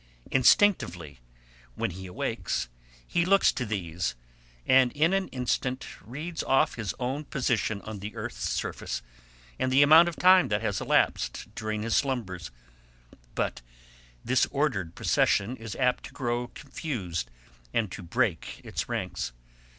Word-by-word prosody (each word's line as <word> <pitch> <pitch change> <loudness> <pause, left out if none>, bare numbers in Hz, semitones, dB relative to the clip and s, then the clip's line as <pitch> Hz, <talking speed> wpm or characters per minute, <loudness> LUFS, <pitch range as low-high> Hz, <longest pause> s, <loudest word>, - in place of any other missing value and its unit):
Instinctively, 90 - +3 0.6
when 115 -3 -1
he 95 +2 -8
awakes, 75 -7 -2 0.4
he 170 - +1
looks 195 +3 +5
to 125 - -3
these, 85 - -2 0.5
and 130 -1 +5
in 160 +5 +3
an 195 -1 +1
instant 125 0 -2 0.2
reads 150 - -5
off 135 - +3
his 110 -5 -4
own 130 +4 -2
position 120 -7 0
on 110 -2 -6
the 105 +2 -7
earth's - - -4
surface - - -3 0.6
and 130 - +1
the 135 +2 +6
amount 160 +4 +8
of 170 - -7
time 185 +1 +6
that 105 +1 -1
has 100 -3 -1
elapsed - - +1
during 110 -1 -3
his 115 0 0
slumbers; 100 - -1 0.9
but - - -1 0.6
this 130 0 +3
ordered 120 - -1
procession 105 +6 +2
is 115 -2 -7
apt 125 -1 +1
to - - -11
grow 120 -2 -2
confused, 105 - -5 0.4
and 110 -5 0
to - - -7
break 85 - -1
its - - -4
ranks. - - -3
120 Hz, 140 wpm, -28 LUFS, 95-140 Hz, 0.9 s, amount